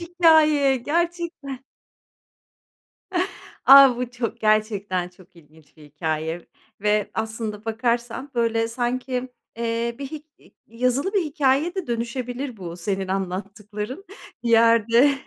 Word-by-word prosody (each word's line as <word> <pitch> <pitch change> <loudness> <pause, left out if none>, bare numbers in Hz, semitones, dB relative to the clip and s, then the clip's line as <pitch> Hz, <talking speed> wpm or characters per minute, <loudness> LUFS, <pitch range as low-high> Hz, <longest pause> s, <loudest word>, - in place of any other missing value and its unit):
hikâye 315 -5 +4
gerçekten. 325 -2 -3 2.0
A, 270 -2 +9
bu 250 -1 -3
çok, 235 -1 -4
gerçekten 205 -4 +1
çok 180 -1 -21
ilginç 155 -1 -21
bir 155 - -15
hikâye 160 +2 -4 0.3
ve 210 0 +1
aslında, 220 -1 -4
bakarsan 235 +4 -2
böyle 230 -1 +1
sanki, 250 +1 -2 0.3
eee, 235 0 -2
bir 275 - -5
hi 305 +2 -8 0.2
i - - -23
yazılı 255 - -1
bir 400 - +3
hikâyeye 290 +3 +1
de 380 -3 -4
dönüşebilir 245 +2 -4
bu 175 -3 -7
senin 190 +2 -3
anlattıkların, 205 - -5 0.4
bir 235 - -2
yerde. 230 +3 +5
235 Hz, 115 wpm, -23 LUFS, 210-270 Hz, 2.0 s, A